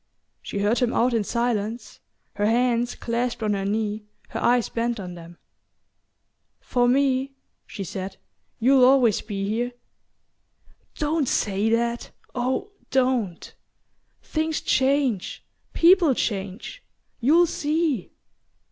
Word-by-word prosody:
She - - -6
heard 205 +4 +1
him 245 -2 +1
out 245 +1 +2
in 225 -2 +1
silence, 230 -1 -2 0.4
her 205 +1 +2
hands 240 +1 +1
clasped 235 0 -2
on 210 -1 +1
her 195 -1 -2
knee, 210 +1 -2 0.2
her - - -4
eyes 245 -1 +2
bent 235 0 -2
on 180 -2 -6
them. 170 0 -12 1.2
"For 245 -1 +1
me," 270 +1 +2 0.3
she 200 - -6
said, 190 +1 -6 0.4
"you'll 260 +2 +4
always 250 -5 +5
be 200 -2 -4
here." 240 +4 -1 1.2
"Don't 300 -2 0
say 205 0 0
that 235 +1 0 0.2
oh, 260 +11 -2 0.2
don't! 250 -9 0 0.7
Things 315 0 -1
change... 265 -6 0 0.3
people 340 -5 +5
change...You'll 240 - -1
see!" 305 - -1
240 Hz, 110 wpm, -24 LUFS, 210-265 Hz, 1.2 s, always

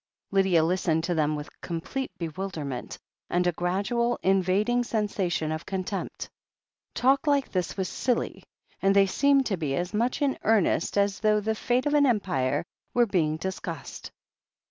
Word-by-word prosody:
Lydia 190 -4 +4
listened 165 -1 +1
to 175 - 0
them 155 -2 +1
with 150 0 -5
complete 180 +11 -4
bewilderment, 160 -6 -5 0.3
and 180 0 +1
a 175 - +3
gradual, 200 +8 0
invading 195 +6 +2
sensation 200 -8 -1
of 155 +1 -3
contempt. 190 +1 -4 0.7
Talk 275 +4 +3
like 285 -2 +2
this 180 -1 -2
was 190 -1 -1
silly, 245 +4 -1 0.4
and 195 +1 +3
they 200 0 +6
seemed 275 +7 +3
to 195 -5 -1
be 145 -5 -1
as 180 +5 -2
much 240 +7 0
in 275 -2 0
earnest 210 -4 +2
as 200 0 +2
though 215 -1 +3
the 220 +1 -1
fate 245 +3 0
of 295 - +1
an 290 -1 +5
empire 180 - 0 0.3
were 240 -1 +5
being 160 -7 +1
discussed. 190 +3 -6
195 Hz, 155 wpm, -27 LUFS, 170-235 Hz, 0.7 s, they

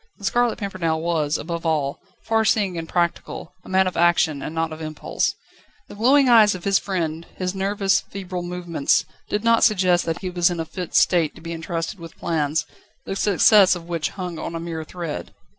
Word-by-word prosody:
The 200 - -9
Scarlet 240 +3 +1
Pimpernel 180 -6 -2
was, 160 -2 0
above 170 +1 -5
all, 150 -4 0 0.2
far 225 0 +2
seeing 205 -4 +1
and 165 -1 -5
practical, 170 -1 -2
a - - -13
man 190 0 +3
of 185 - -2
action 170 -3 +3
and 155 - -6
not 165 0 -1
of 155 - -9
impulse. 155 -1 -2 0.5
The - - -9
glowing 260 +6 +4
eyes 220 -5 +6
of 180 - -9
his 195 -1 +3
friend, 170 -4 -3
his 180 0 -2
nervous, 195 0 +1
febrile 185 -2 -5
movements, 175 -4 0 0.2
did 210 +1 -1
not 230 0 +4
suggest 185 -5 +3
that 165 0 -3
he 185 -2 -4
was 175 -1 +3
in 175 -1 -4
a 165 - -2
fit 180 +1 -6
state 170 -4 +3
to - - -13
be 165 +1 -6
entrusted 165 +3 -4
with 165 -1 -11
plans, 155 -2 -1 0.4
the 195 - -4
success 200 -1 +5
of 170 -1 -9
which 170 -3 -2
hung 180 -4 -6
on 170 - -5
a - - -3
mere 165 -1 -5
thread. 165 -1 -6
175 Hz, 200 wpm, -22 LUFS, 165-195 Hz, 0.5 s, eyes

